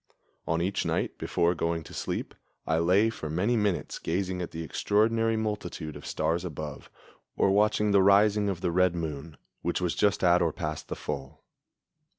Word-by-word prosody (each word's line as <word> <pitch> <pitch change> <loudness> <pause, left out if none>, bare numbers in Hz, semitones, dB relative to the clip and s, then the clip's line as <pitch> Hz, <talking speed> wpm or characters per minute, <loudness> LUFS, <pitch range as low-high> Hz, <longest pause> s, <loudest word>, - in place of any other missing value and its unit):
On 80 +1 +1
each 95 +2 -1
night - - -2
before 85 +1 +1
going 85 -1 -1
to - - -12
sleep, - - -4 0.3
I 80 - +1
lay 95 +7 +3
for 80 -8 -6
many 95 +10 +1
minutes 105 -5 -1
gazing 90 +1 -2
at 90 - -4
the 80 0 -6
extraordinary 110 +6 +1
multitude 90 -8 -4
of 75 - -9
stars 85 +2 0
above, 75 -4 -6 0.5
or 95 - +3
watching 105 +1 +3
the 100 -1 +5
rising 100 +1 +4
of 90 -3 -3
the 85 - 0
red 90 0 +3
moon, 80 -2 -5 0.2
which 85 - -1
was 90 -2 0
just 100 -2 +1
at 90 0 +5
or 85 -2 +2
past 75 0 -4
the - - -4
full. 65 0 -6
90 Hz, 175 wpm, -28 LUFS, 80-100 Hz, 0.5 s, the